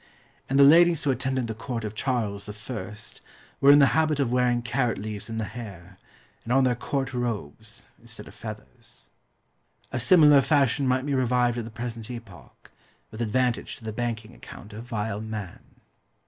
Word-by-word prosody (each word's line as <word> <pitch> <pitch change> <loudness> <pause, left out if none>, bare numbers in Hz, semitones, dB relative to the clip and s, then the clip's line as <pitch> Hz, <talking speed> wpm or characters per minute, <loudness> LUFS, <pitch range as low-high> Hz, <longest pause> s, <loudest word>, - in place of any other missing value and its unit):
And 135 - +1
the 140 - +8
ladies 165 +3 +6
who 145 - +2
attended 130 0 -1
the 110 - -4
court 115 +1 -5
of 105 -1 -4
Charles 105 -5 -2
I. 105 -1 -6 0.7
were 140 - +5
in 145 - +8
the 140 - +7
habit 155 -2 +2
of 130 -4 +1
wearing 125 -1 +2
carrot 120 0 0
leaves 105 0 -6
in 110 - -4
the 110 - -1
hair, 100 -5 -9 0.4
and 115 - -5
on 135 +1 +4
their 125 -1 +3
court 135 +2 -3
robes, 115 - -5
instead - - -9
of - - -12
feathers. - - -10 0.9
A 130 - -2
similar 150 -1 +6
fashion 140 -2 +2
might 130 +1 +1
be 145 - -1
revived 125 -2 +1
at 115 - -4
the - - -7
present 115 -1 -6
epoch, 110 - -11 0.4
with 110 - -7
advantage 120 +1 0
to - - -17
the 110 -1 -5
banking 115 -1 -4
account 105 -3 -12
of 110 +3 -8
vile 105 -3 -3
man. 110 -4 -6
120 Hz, 175 wpm, -26 LUFS, 110-130 Hz, 0.9 s, the